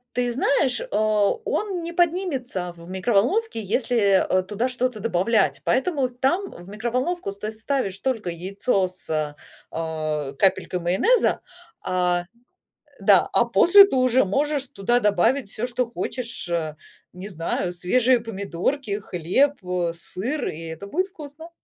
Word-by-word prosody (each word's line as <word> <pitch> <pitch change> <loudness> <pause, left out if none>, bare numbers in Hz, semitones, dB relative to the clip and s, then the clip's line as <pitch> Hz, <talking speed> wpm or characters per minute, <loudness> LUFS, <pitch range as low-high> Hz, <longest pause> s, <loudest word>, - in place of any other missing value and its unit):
Ты 245 -1 0
знаешь, 265 -1 +2
э, - - -5
он 215 - 0
не 340 +1 -5
поднимется 310 - -1
в 170 +1 -13
микроволновке, 225 - +1
если, 235 +4 0 0.3
э, 185 0 +2
туда 215 +6 -2
что-то 250 -3 -2
добавлять, 220 +1 +1
поэтому 265 0 +1
там 270 +11 -1
в 175 +2 -12
микроволновку 240 - -2
стать 215 +2 -7
ставишь 225 -6 -2
только 225 -7 -2
яйцо 190 +3 -1
с, 155 -5 -3 0.3
э, 155 -3 -3
капелькой 185 -2 +1
майонеза, 190 - +2 0.4
а, 180 -1 +1
э, - - -16 0.8
да, - - +5
а - - +4
после 395 +3 +7
ты 395 - -3
уже 255 -2 +3
можешь 280 +5 0
туда 240 +4 0
добавить 210 +3 +2
всё, 225 +3 -3
что 250 -1 -1
хочешь. 235 -4 -4
Э, 160 -3 -2 0.4
не 185 +3 -8
знаю, 175 +1 -2
свежие 245 +8 +2
помидорки, 205 +2 -3
хлеб, 190 - 0
э, 180 -2 -1
сыр, 235 - -4
и 160 - -5
это 165 +5 -7
будет 370 - 0
вкусно. 320 -2 -11
225 Hz, 140 wpm, -23 LUFS, 185-265 Hz, 0.8 s, после